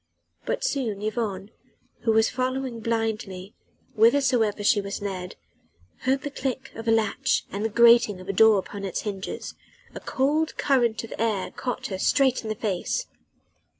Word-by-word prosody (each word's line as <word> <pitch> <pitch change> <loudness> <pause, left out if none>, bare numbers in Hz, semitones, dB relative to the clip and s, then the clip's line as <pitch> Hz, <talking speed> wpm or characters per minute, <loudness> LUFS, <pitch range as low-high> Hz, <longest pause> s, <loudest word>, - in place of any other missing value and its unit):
But - - -1
soon 255 - -1
Yvonne 215 -3 -3 0.5
who 225 - +1
was 220 0 +4
following 255 -1 -2
blindly 220 -4 -3 0.4
whithersoever 230 -2 +3
she 205 0 +4
was 200 0 -5
led 185 -3 -5 0.7
heard 265 +2 +1
the 290 - -4
click 265 -1 -4
of 225 +1 -8
a - - +4
latch 220 -2 +1
and 200 +2 -3
the 220 - 0
grating 235 -3 +5
of 185 - -11
a 195 - -1
door 220 +1 +6
upon 200 +1 -5
its 190 -3 -3
hinges: 200 -2 -5 0.4
a - - -6
cold 300 +4 0
current 240 -6 +2
of 230 - -7
air 215 -4 0
caught 250 -2 -4
her 190 -2 -4
straight 265 +4 +3
in 220 - -6
the 215 - -1
face. 210 - -2
225 Hz, 160 wpm, -25 LUFS, 205-255 Hz, 0.7 s, door